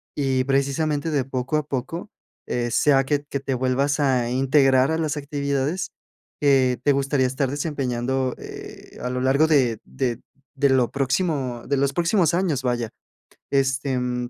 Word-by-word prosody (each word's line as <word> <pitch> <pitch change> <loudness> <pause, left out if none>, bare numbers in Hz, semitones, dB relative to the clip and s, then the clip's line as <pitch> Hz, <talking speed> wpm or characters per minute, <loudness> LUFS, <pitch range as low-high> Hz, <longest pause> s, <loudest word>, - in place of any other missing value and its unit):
y 135 -3 +1
precisamente 140 +3 0
de 140 -4 0
poco 135 +2 -2
a 150 - 0
poco, 165 - -4 0.4
eh, 120 -1 -1
sea 135 +3 +4
que 145 +1 -1
que 140 - -2
te 135 0 -2
vuelvas 130 +3 0
a 130 -4 +2
integrar 135 +1 +3
a 160 - +1
las 155 -2 -1
actividades 145 +4 -2 0.5
que 135 -3 +3
te 145 - +4
gustaría 135 0 +1
estar 130 +1 -1
desempeñando, 130 -3 -2
eh, - - -10
a 125 - -2
lo 125 0 -2
largo 135 +4 +3
de 130 -8 +2
de 125 -4 -3 0.3
de 140 0 +3
lo 130 -3 +2
próximo 135 -3 -1
de 140 - +1
los 140 0 +1
próximos 170 +1 +2
años, 170 -7 +1
vaya. 120 -3 -1 0.6
Este, 135 -1 +1
mm 125 -1 -2
135 Hz, 160 wpm, -23 LUFS, 130-145 Hz, 0.6 s, sea